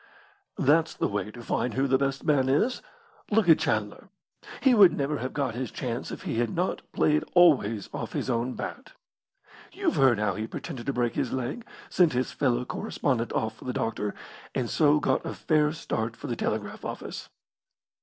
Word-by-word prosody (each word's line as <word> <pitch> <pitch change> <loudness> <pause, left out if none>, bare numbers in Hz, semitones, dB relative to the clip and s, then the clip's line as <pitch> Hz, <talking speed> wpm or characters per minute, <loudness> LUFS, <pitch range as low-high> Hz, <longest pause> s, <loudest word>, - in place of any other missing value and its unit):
"That's 160 +4 +3
the - - 0
way 100 0 -3
to 120 +2 -10
find 120 +1 -1
who 135 +1 +2
the 130 -1 +2
best 135 0 -1
man 140 -4 +2
is. 220 - +1 0.5
Look 215 -2 +3
at 160 - +7
Chandler. - - -2 0.5
He 265 - +4
would 200 -6 +7
never 145 +1 -1
have 130 +2 -3
got 140 -5 -1
his 125 0 -4
chance 125 0 -4
if - - -7
he 115 - -2
had 120 -1 +1
not 180 - -1
played 150 0 +2
always 130 - +4
off - - -5
his - - -2
own 125 0 -1
bat. - - -7 0.8
You've 390 -5 -1
heard 130 -4 +5
how 105 -1 0
he 110 +4 -4
pretended 140 -3 -7
to 140 - 0
break 120 -2 0
his - - -1
leg, 130 - -4 0.2
sent 170 -6 +3
his 125 +1 -1
fellow 125 -3 0
correspondent 125 -2 -2
off 110 - -1
for - - -13
the 125 - -2
doctor, 105 -2 -2 0.4
and 125 -3 -1
so 150 -1 +4
got 135 -3 +1
a - - -5
fair 150 -2 +2
start 115 -8 -3
for - - -10
the 120 -4 -2
telegraph 105 -2 -3
office." - - -6
130 Hz, 190 wpm, -27 LUFS, 120-150 Hz, 0.8 s, at